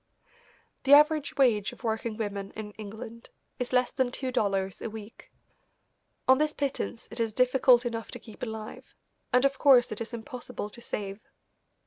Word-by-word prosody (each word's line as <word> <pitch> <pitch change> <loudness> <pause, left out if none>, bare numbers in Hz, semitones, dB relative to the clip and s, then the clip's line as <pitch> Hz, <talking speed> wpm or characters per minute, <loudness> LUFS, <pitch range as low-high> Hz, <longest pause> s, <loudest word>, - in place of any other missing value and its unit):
The 275 - +4
average 300 0 +5
wage 220 -7 +3
of - - -16
working 220 -1 -2
women 200 -3 -3
in 215 -1 -6
England 220 +2 -9 0.3
is 250 - -2
less 250 0 +2
than 260 -2 +1
two 260 +1 -3
dollars 195 -5 0
a - - -3
week. 220 0 -11 1.0
On 260 +1 +6
this 305 0 +1
pittance 275 -4 -3
it - - -6
is 225 -2 0
difficult 255 0 +4
enough 230 -1 -3
to - - -6
keep 220 - -14
alive, 220 -2 -7 0.4
and 250 +2 +4
of 275 -1 +1
course 255 -4 +6
it 215 - -4
is 230 - -5
impossible 240 -2 -6
to 235 - -12
save. 200 -3 -5
235 Hz, 165 wpm, -28 LUFS, 215-255 Hz, 1.0 s, On